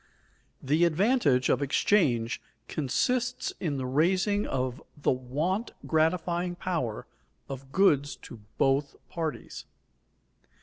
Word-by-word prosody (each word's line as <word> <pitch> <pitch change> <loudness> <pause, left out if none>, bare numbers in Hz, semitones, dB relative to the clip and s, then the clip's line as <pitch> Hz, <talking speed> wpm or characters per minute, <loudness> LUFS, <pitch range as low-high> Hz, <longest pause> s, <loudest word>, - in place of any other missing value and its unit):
_The 150 +5 +3
advantage 165 - +2
of 130 - +2
exchange 130 - +2 0.3
consists 235 - -1
in 150 -6 -2
the 130 - -3
raising 185 +9 +2
of 130 +2 -2 0.2
the 145 - +1
want 150 - -2
gratifying 175 +2 +1
power 165 - -3 0.4
of 135 0 -8
goods 145 -7 +3
to 120 - -10 0.2
both 135 +1 +2
parties. 160 -3 -5
155 Hz, 100 wpm, -28 LUFS, 130-180 Hz, 0.4 s, The